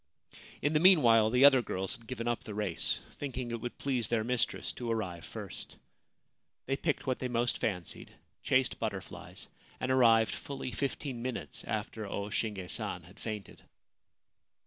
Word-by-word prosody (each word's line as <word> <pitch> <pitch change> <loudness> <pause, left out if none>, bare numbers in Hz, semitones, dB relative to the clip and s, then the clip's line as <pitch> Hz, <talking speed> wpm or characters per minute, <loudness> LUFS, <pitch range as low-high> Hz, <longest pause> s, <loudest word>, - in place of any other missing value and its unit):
In 145 +2 +2
the 150 - +4
meanwhile 120 - +7
the 125 +4 +6
other 135 -3 +8
girls 95 0 -2
had 115 -2 -16
given 120 -2 -4
up 120 -1 -1
the 105 - -7
race, 105 -5 0 0.2
thinking 130 -4 -4
it 115 -1 -3
would 120 - -5
please 130 -5 0
their 115 -2 +1
mistress 125 0 0
to 120 -2 -5
arrive 90 -7 -2
first. - - -7 0.9
They 135 - 0
picked 150 +1 -1
what 130 -2 0
they 130 - -1
most 120 0 0
fancied, 90 -6 -3 0.3
chased 130 -1 +2
butterflies, 100 -4 -5 0.3
and 130 - -1
arrived 115 -4 +5
fully 135 -2 -5
fifteen 135 -1 -3
minutes 125 0 -4
after 110 -1 -3
O 100 +1 -4
Shinge 100 -5 -2
San - - -2
had - - -16
fainted. 105 -3 -6
120 Hz, 160 wpm, -32 LUFS, 110-130 Hz, 0.9 s, other